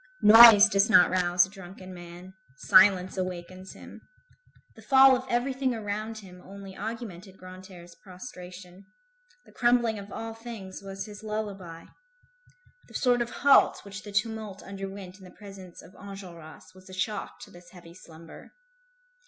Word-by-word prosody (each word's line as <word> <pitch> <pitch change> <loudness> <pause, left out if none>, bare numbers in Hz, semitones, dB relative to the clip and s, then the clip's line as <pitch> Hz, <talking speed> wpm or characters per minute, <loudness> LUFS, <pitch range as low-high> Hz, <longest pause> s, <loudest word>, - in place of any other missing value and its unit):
Noise 225 -1 +9
does 200 0 +1
not 180 -6 +5
rouse 180 -1 +2
a - - -15
drunken 190 -1 -12
man; 175 +1 -12 0.2
silence 190 +3 +3
awakens 185 0 -7
him. - - -14 0.7
The - - -15
fall 265 -1 +5
of 255 +1 -6
everything 255 +1 -1
around 215 +1 -5
him 180 -4 -13
only 195 0 -12
augmented 205 -4 -8
Grantaire's 185 -1 -13
prostration; 180 -1 -13 0.6
the - - -20
crumbling 240 -3 +1
of 200 0 -12
all 225 0 -7
things 225 -5 -10
was 195 0 -8
his 210 -1 -12
lullaby. 200 -6 -7 1.0
The - - -17
sort 245 -2 +1
of 240 - -3
halt 280 -4 +3
which 200 +1 -9
the 205 - -11
tumult 215 -1 -4
underwent 195 -1 -9
in - - -16
the 180 - -13
presence 195 -3 -13
of 175 - -17
Enjolras 185 -4 -12
was 185 +1 -18
a - - -12
shock 200 +2 -5
to - - -12
this 175 0 -16
heavy 170 -2 -15
slumber. 165 -2 -15
195 Hz, 150 wpm, -26 LUFS, 185-215 Hz, 1.0 s, Noise